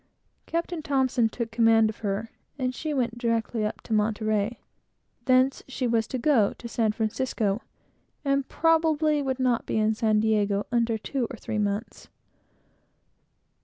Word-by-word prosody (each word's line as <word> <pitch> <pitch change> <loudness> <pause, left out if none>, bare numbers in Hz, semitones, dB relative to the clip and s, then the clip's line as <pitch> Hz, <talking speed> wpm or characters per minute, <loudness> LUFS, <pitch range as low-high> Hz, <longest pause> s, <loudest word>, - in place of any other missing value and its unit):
Captain 335 0 -2
T 265 -5 +2
took 225 0 -5
command 225 -1 +4
of - - -16
her, 210 +2 -3 0.3
and 255 -2 -1
she 310 +3 -4
went 240 -4 -1
directly 230 -1 0
up 210 - -3
to 225 - -5
Monterey; 215 +1 0
from 240 - -44
thence 255 +1 +3
she 265 -1 -3
was 230 -2 +1
to 260 - -3
go 240 -5 +3
to 240 - -9
San 225 -2 +1
Francisco, 220 -1 -1 0.6
and 275 -1 +1
probably 315 -2 +2
would 265 -2 -2
not 250 -2 +1
be - - -1
in 215 0 +2
San 215 -1 +2
Diego 210 -2 +1
under 230 -2 +1
two 245 +2 -2
or 250 - -7
three 215 - -3
months. 205 +2 -3
230 Hz, 155 wpm, -26 LUFS, 215-265 Hz, 0.6 s, command